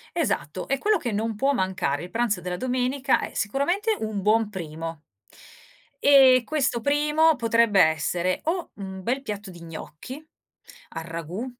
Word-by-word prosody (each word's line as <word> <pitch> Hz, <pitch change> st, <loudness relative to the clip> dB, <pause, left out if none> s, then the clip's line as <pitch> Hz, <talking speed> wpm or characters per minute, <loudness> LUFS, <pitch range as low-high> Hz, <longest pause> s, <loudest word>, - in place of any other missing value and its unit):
Esatto, 185 Hz, -, -2 dB
e 275 Hz, -, 0 dB
quello 425 Hz, +8 st, +2 dB
che 240 Hz, -7 st, -3 dB
non 220 Hz, +1 st, -2 dB
può 270 Hz, +5 st, +2 dB
mancare, 185 Hz, -, -1 dB
il 175 Hz, -, -8 dB
pranzo 225 Hz, -5 st, 0 dB
della 180 Hz, 0 st, -4 dB
domenica 255 Hz, +3 st, 0 dB
è -, -, -5 dB
sicuramente 350 Hz, -, 0 dB
un 215 Hz, -2 st, -3 dB
buon 215 Hz, +1 st, +2 dB
primo. 165 Hz, -3 st, -6 dB, 1.0 s
E 265 Hz, -3 st, +7 dB
questo 275 Hz, -6 st, 0 dB
primo, 300 Hz, +4 st, +3 dB
potrebbe 230 Hz, -3 st, +3 dB
essere: 170 Hz, +3 st, +1 dB
o 345 Hz, +2 st, -2 dB
un 190 Hz, -1 st, -7 dB
bel 250 Hz, +7 st, -1 dB
piatto 210 Hz, -6 st, -6 dB
di 175 Hz, -1 st, -12 dB
gnocchi, 170 Hz, -, -9 dB, 0.7 s
al 165 Hz, -, -5 dB
ragù 170 Hz, +7 st, -5 dB
225 Hz, 150 wpm, -25 LUFS, 180-275 Hz, 1.0 s, E